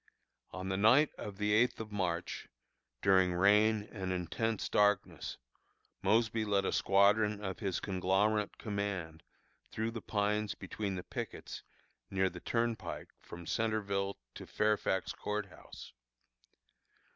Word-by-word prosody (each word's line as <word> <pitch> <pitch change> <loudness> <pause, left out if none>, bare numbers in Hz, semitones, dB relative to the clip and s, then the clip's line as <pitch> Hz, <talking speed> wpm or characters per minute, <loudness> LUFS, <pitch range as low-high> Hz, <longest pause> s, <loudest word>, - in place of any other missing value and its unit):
On 95 +1 -5
the 95 - 0
night 125 +9 +5
of 100 -2 -6
the 105 0 +1
eighth 120 +4 +3
of 110 -1 -6
March, 90 -4 -2 0.6
during 95 -2 +4
rain 105 +3 +4
and 95 -3 -4
intense 95 +5 -1
darkness, 105 -1 +1 0.6
Mosby 110 0 +2
led 100 -2 +1
a - - +1
squadron 100 +2 +3
of 95 -1 -4
his 95 -5 -1
conglomerate 100 +3 +1
command 100 -6 -3 0.5
through 110 +1 -2
the 115 -1 -6
pines 105 0 0
between 100 -3 -4
the 90 - -5
pickets - - -6 0.5
near 95 -1 +1
the 90 - -8
Turnpike 115 0 -2
from 85 0 -10
Centreville 100 -2 -1 0.2
to - - -9
Fairfax 105 -3 0
Court 105 0 -3
House. - - -12
100 Hz, 125 wpm, -33 LUFS, 95-110 Hz, 0.6 s, night